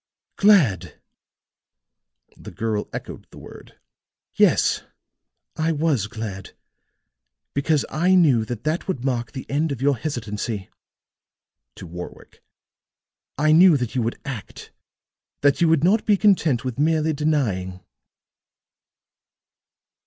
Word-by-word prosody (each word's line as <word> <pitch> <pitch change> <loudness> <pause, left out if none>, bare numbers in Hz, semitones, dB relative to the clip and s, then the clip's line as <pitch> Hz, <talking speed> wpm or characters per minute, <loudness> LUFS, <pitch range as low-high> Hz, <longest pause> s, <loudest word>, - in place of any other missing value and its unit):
"Glad!" 185 - +3 1.4
the - - -11
girl 105 +3 -3
echoed - - -8
the - - -15
word. - - -13 0.6
"Yes, - - +3 0.7
I 160 +1 0
was 150 -9 0
glad. 105 -3 -7 1.0
Because 145 +1 +1
I 180 +4 +2
knew 145 -11 +4
that 115 0 -6
that 155 +6 -2
would 135 -10 -3
mark 120 -3 -2
the 130 - -7
end 150 +3 -1
of 135 - -4
your 140 +1 +2
hesitancy," 110 -6 -5 1.0
to - - -10
Warwick. 90 +1 -10 1.0
"I 155 +2 +2
knew 170 0 +7
that 125 -4 -4
you 125 - 0
would 115 +1 -3
act 125 -7 -8 0.7
that 140 +2 +2
you 170 - +5
would 160 -2 +2
not 205 +5 +3
be 205 -2 +4
content 170 - +2
with 130 0 -4
merely 160 +1 +1
denying." 120 -12 -1
140 Hz, 115 wpm, -22 LUFS, 115-160 Hz, 1.4 s, knew